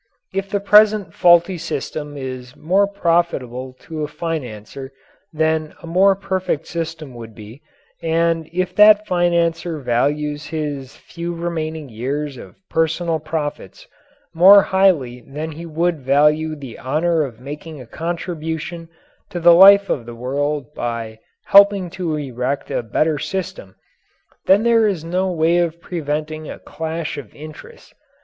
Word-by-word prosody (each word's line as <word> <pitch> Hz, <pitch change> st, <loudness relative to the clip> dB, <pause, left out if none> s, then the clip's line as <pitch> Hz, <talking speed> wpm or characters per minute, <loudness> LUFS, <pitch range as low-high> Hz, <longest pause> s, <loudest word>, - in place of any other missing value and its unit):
If 195 Hz, 0 st, -3 dB
the 200 Hz, -, -1 dB
present 210 Hz, 0 st, +4 dB
faulty 175 Hz, +1 st, +4 dB
system 150 Hz, -2 st, -5 dB
is 130 Hz, -2 st, -7 dB
more 195 Hz, +5 st, +2 dB
profitable 165 Hz, -10 st, -1 dB
to 160 Hz, -2 st, -7 dB
a -, -, -2 dB
financier 135 Hz, -5 st, -6 dB, 0.4 s
than 160 Hz, 0 st, -1 dB
a 165 Hz, -, -12 dB
more 190 Hz, +4 st, +3 dB
perfect 190 Hz, -5 st, -2 dB
system 160 Hz, -4 st, -5 dB
would 115 Hz, -2 st, -10 dB
be, 110 Hz, +6 st, -12 dB, 0.4 s
and 165 Hz, -1 st, 0 dB
if 185 Hz, +1 st, -2 dB
that 210 Hz, 0 st, +7 dB
financier 170 Hz, -2 st, 0 dB
values 145 Hz, +4 st, -1 dB
his 145 Hz, -4 st, -5 dB
few 170 Hz, 0 st, -7 dB
remaining 160 Hz, -3 st, -4 dB
years 135 Hz, +5 st, -4 dB
of -, -, -12 dB
personal 165 Hz, 0 st, 0 dB
profits 155 Hz, -, -5 dB, 0.5 s
more 190 Hz, +4 st, +8 dB
highly 170 Hz, -11 st, +2 dB
than 150 Hz, +6 st, -6 dB
he 165 Hz, +2 st, -9 dB
would 165 Hz, +1 st, -1 dB
value 150 Hz, +4 st, +2 dB
the 135 Hz, -6 st, -10 dB
honour 160 Hz, +5 st, 0 dB
of 125 Hz, -6 st, -5 dB
making 150 Hz, +3 st, -8 dB
a 125 Hz, -, -10 dB
contribution 165 Hz, +2 st, -5 dB, 0.4 s
to 175 Hz, -, -5 dB
the 170 Hz, 0 st, +7 dB
life 200 Hz, +3 st, +8 dB
of 120 Hz, -4 st, -3 dB
the 120 Hz, -, -8 dB
world 140 Hz, +2 st, -3 dB
by 115 Hz, -2 st, -5 dB, 0.3 s
helping 200 Hz, -3 st, +5 dB
to 170 Hz, -4 st, -3 dB
erect 135 Hz, -1 st, -3 dB
a -, -, -1 dB
better 150 Hz, +7 st, 0 dB
system, 150 Hz, -, -5 dB, 0.7 s
then 200 Hz, +3 st, +5 dB
there 230 Hz, -2 st, +4 dB
is 185 Hz, -6 st, -2 dB
no 185 Hz, +3 st, -1 dB
way 170 Hz, +1 st, +2 dB
of 170 Hz, -1 st, -1 dB
preventing 155 Hz, -2 st, -4 dB
a -, -, -7 dB
clash 160 Hz, -1 st, -5 dB
of 140 Hz, -, -12 dB
interests. 155 Hz, +1 st, -12 dB
160 Hz, 140 wpm, -20 LUFS, 145-175 Hz, 0.7 s, more